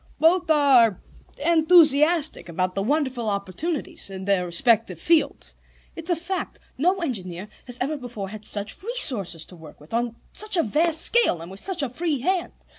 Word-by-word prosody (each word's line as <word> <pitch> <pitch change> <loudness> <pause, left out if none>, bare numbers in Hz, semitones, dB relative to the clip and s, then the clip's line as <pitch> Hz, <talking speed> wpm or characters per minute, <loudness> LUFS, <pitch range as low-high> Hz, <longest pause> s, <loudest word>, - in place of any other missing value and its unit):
"Both 340 +1 +3
are 265 - +4 0.5
enthusiastic 320 - +4
about 185 +2 -2
the 195 - -2
wonderful 260 -2 -1
opportunities 200 - -4
in 190 -1 -8
their 195 -3 +1
respective 180 -1 +2
fields. 330 - 0 0.4
It's 330 +1 -5
a 350 - +2
fact: 355 +3 -5 0.2
no 360 +7 0
engineer 190 - -5 0.2
has 245 -1 -4
ever 295 +4 -2
before 235 -7 -7
had 215 +1 -9
such 205 0 -4
resources 250 - +3
to 180 - -14
work 160 -3 -14
with, 150 +6 -16
on 235 0 -1 0.2
such 425 -3 +1
a 335 - +3
vast 315 +7 +1
scale, 470 - +2
and 170 +2 -10
with 195 - -9
such 370 - -2
a 275 - -2
free 315 +2 -2
hand. 365 +4 -1
260 Hz, 170 wpm, -23 LUFS, 195-330 Hz, 0.5 s, are